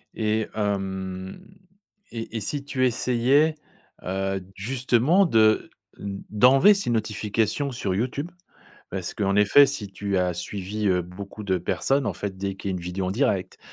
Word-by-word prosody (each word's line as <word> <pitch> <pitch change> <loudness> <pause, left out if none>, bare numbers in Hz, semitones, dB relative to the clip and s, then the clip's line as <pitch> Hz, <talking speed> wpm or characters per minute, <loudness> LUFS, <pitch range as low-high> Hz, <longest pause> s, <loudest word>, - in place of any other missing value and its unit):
Et 110 0 0
hem 95 - -3 0.7
et 115 -1 -5
et - - -1
si 140 +7 -2
tu 130 -2 0
essayais, 130 +5 +2 0.5
heu, 95 +1 -2
justement 130 - +2
de 110 -8 +3 0.3
d 100 -1 -6
d'enlever 130 - +6
ces 200 -9 -2
notifications 110 +4 -1
sur 100 -7 -2
YouTube? 130 - -2 0.6
Parce 95 -2 -4
qu'en 100 -2 0
effet 105 +8 +7
si 135 -7 -4
tu 100 0 -3
as 90 -1 +1
suivi 100 +4 -3
beaucoup 95 +4 -9
de 95 -2 +1
personnes, 100 - 0
en - - 0
fait, 100 -2 -5
dès 95 0 -3
qu'il 100 - -4
y - - -1
a - - -2
une - - -6
vidéo 90 +2 -3
en - - -1
direct, 100 -4 0
105 Hz, 155 wpm, -25 LUFS, 95-125 Hz, 0.7 s, effet